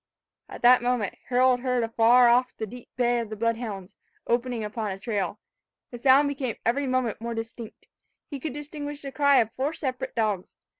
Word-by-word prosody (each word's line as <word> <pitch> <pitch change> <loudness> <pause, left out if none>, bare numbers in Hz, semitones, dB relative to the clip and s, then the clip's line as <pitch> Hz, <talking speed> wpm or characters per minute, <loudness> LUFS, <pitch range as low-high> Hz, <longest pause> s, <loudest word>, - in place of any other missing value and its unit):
At - - -10
that 250 +1 +7
moment, 240 -5 0 0.2
Harold 255 0 +4
heard 250 -1 0
afar 230 +2 +5
off 250 +1 +2
the 220 - -3
deep 245 +4 -12
bay 240 -1 +2
of 230 -2 -4
the 215 - -5
blood 230 +1 0
hounds, 200 -6 -7 0.3
opening 240 -1 -1
upon 215 0 -3
a 190 - -4
trail. 200 -1 -3 0.5
The 240 - -8
sound 270 +3 +5
became 270 -5 -3
every 270 +5 +1
moment 255 -4 -1
more 235 0 -4
distinct. 225 0 -8 0.4
He 280 - -6
could 285 0 -4
distinguish 290 0 -7
the 275 - -6
cry 285 0 +3
of 225 -1 -2
four 275 +5 -1
separate 260 -5 -4
dogs. 210 -5 -2
245 Hz, 190 wpm, -26 LUFS, 225-260 Hz, 0.5 s, that